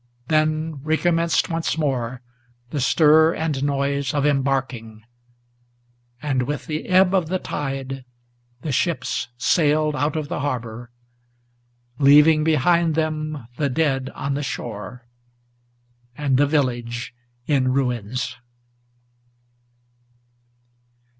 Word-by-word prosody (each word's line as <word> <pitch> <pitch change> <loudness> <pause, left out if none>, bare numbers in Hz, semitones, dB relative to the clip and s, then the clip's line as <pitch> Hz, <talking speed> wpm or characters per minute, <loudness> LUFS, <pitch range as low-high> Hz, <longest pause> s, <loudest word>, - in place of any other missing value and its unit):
Then 155 -1 0
recommenced 165 +2 +1
once 165 -2 -2
more 130 -5 -2 0.5
the 145 - -2
stir 160 +4 +5
and 150 -4 -2
noise 140 -1 -1
of 145 -1 +1
embarking; 130 -6 -1 1.2
And 135 -4 0
with 145 +4 -3
the 155 -2 -4
ebb 185 0 +4
of 185 -4 +2
the 185 +3 0
tide 135 -5 -4 0.6
the 155 - -2
ships 165 +3 -1
sailed 150 +2 +2
out 150 +2 0
of 155 -2 -2
the - - -3
harbor, 120 -4 -4 1.1
Leaving 150 +2 +6
behind 160 +1 +2
them 155 -4 -2
the 145 -2 0
dead 135 -2 0
on 140 - -2
the 145 - -2
shore, 120 -2 -6 1.1
and 140 -3 +1
the 145 +2 +4
village 120 -4 -1 0.3
in 135 -3 +2
ruins. 125 -1 -2
145 Hz, 105 wpm, -22 LUFS, 130-155 Hz, 1.2 s, Leaving